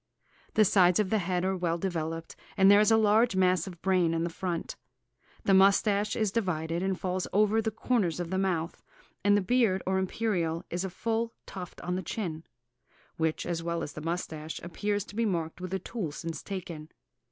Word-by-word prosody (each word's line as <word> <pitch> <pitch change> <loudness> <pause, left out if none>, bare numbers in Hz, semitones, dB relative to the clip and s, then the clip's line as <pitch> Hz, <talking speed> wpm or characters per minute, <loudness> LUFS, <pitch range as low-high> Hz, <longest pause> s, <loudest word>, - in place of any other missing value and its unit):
The 215 - +6
sides 180 -2 +4
of 205 -3 0
the 220 - +3
head 180 0 -1
are 190 0 +1
well 175 -2 -1
developed, 165 -2 -3 0.2
and 195 0 +7
there 205 - +7
is 210 - +4
a 225 - +5
large 220 +1 +4
mass 185 -2 +2
of 175 -3 -10
brain 180 -3 +2
in 165 - 0
the 170 - -2
front. 175 -1 -3 0.7
The 195 - +3
moustache 200 +2 +4
is 215 -4 0
divided, 170 -6 -1
and 190 -1 -1
falls 185 0 -2
over 215 +2 +3
the 220 - -1
corners 215 -6 0
of 175 0 -4
the 190 - 0
mouth, 175 -4 -1 0.4
and 205 +1 +5
the - - +2
beard, 205 -2 +2
or 190 0 +1
imperial, 180 -4 -1
is 175 +2 -2
a 190 - -2
full 230 +4 -2
tuft 180 -3 -8
on 180 +1 -2
the - - -2
chin, 170 -3 -4 0.7
which, 160 -1 -1
as 170 -1 -2
well 170 0 -2
as 145 - -6
the 150 - -7
moustache, 160 -1 -4
appears 205 +4 -2
to - - -12
be 230 - +1
marked 165 -3 -2
with 185 0 -5
a 190 - 0
tool 190 -3 -4
since 165 +2 -6
taken. 170 -6 -6
185 Hz, 200 wpm, -29 LUFS, 170-205 Hz, 0.7 s, and